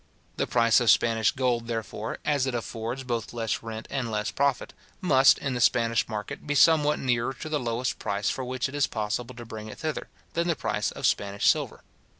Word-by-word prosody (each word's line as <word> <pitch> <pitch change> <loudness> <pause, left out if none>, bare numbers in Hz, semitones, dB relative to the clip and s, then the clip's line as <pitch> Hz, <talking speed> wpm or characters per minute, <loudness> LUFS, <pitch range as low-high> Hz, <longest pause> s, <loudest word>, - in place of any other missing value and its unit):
The - - 0
price 115 -1 +4
of 120 -2 +2
Spanish 115 -1 +4
gold, 120 -3 0
therefore, 110 -1 -4
as 140 -3 +1
it 130 - -1
affords 115 +2 -4
both 120 -3 -3
less 115 -2 -2
rent 110 -1 -7
and 130 -4 -2
less 105 -1 -2
profit, 140 -2 0 0.3
must, 135 -8 +5
in 135 -2 -3
the 125 - -2
Spanish 115 0 +3
market, 105 +5 -6
be 145 - 0
somewhat 150 +1 +5
nearer 125 0 0
to 155 - -7
the 150 -1 0
lowest 120 0 -2
price 100 0 -2
for 130 - -1
which 125 0 -2
it 135 - -10
is 145 -1 +2
possible 110 +2 -3
to 120 0 -9
bring 110 -1 -8
it 110 - -9
thither, 155 -2 -3 0.3
than 170 +1 0
the 170 - +1
price - - -1
of - - -5
Spanish 100 0 0
silver. - - +1
120 Hz, 205 wpm, -27 LUFS, 115-135 Hz, 0.3 s, must